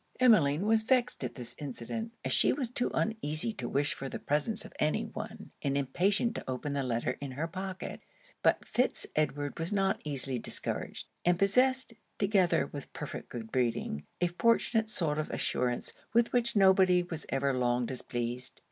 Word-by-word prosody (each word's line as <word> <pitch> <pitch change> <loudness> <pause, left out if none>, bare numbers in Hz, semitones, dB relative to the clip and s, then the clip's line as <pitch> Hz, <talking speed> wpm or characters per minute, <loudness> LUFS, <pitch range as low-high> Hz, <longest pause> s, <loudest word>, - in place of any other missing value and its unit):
Emmeline 185 - +5
was 220 0 +4
vexed 245 - +1
at 125 - -4
this 120 -1 -5
incident, 150 - -5
as - - +1
she - - +4
was 255 -4 -1
too 245 0 0
uneasy 220 -2 -1
to 125 - -5
wish 145 +1 +1
for 135 - -6
the - - -4
presence 150 +10 -1
of - - -11
any 155 0 +1
one, - - -7
and 140 0 0
impatient 195 - +1
to - - -6
open 130 +3 -2
the 140 - 0
letter 125 -1 -1
in 140 -2 -5
her 155 +5 -2
pocket. 190 +2 -5 0.4
But - - +3
Fitz 250 +2 +1
Edward 145 0 -1
was 165 +3 -2
not 195 -1 +1
easily 135 -3 -2
discouraged; - - -4 0.2
and 175 0 +3
possessed, 255 +6 +3 0.2
together 195 -3 +3
with 145 -2 -8
perfect 150 - -6
good 110 -2 -7
breeding, 115 - 0 0.2
a 180 - +3
fortunate 225 +3 +2
sort 155 -7 +1
of 155 - -2
assurance 125 -1 -1 0.2
with 235 0 +3
which 235 -2 +2
nobody 190 -2 +5
was 165 -3 -6
ever 135 0 +1
long 125 -1 +1
displeased. 120 0 -3
155 Hz, 175 wpm, -31 LUFS, 135-215 Hz, 0.4 s, Emmeline